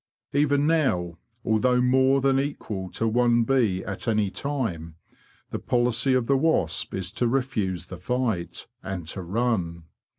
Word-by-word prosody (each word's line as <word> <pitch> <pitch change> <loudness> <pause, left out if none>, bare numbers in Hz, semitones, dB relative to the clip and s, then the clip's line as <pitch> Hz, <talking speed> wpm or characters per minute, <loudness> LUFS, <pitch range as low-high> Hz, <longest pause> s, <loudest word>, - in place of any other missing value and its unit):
Even 145 0 +2
now, 90 - +1 0.3
although 125 +3 +3
more 130 +2 +3
than 135 0 +3
equal 110 -9 -4
to 115 +5 -2
one 120 +1 +3
bee 115 -7 +1
at 95 +4 -5
any 105 -3 +1
time, 100 - -3 0.6
the - - -3
policy 125 +2 +1
of 125 -2 +1
the 135 +2 +3
wasp 130 - +1
is 95 -1 -3
to 120 +3 0
refuse 110 -9 -1
the 90 -1 -9
fight, 110 -4 -2 0.2
and 95 -4 -5
to 95 - -5
run. 90 -4 -1
115 Hz, 145 wpm, -25 LUFS, 95-130 Hz, 0.6 s, although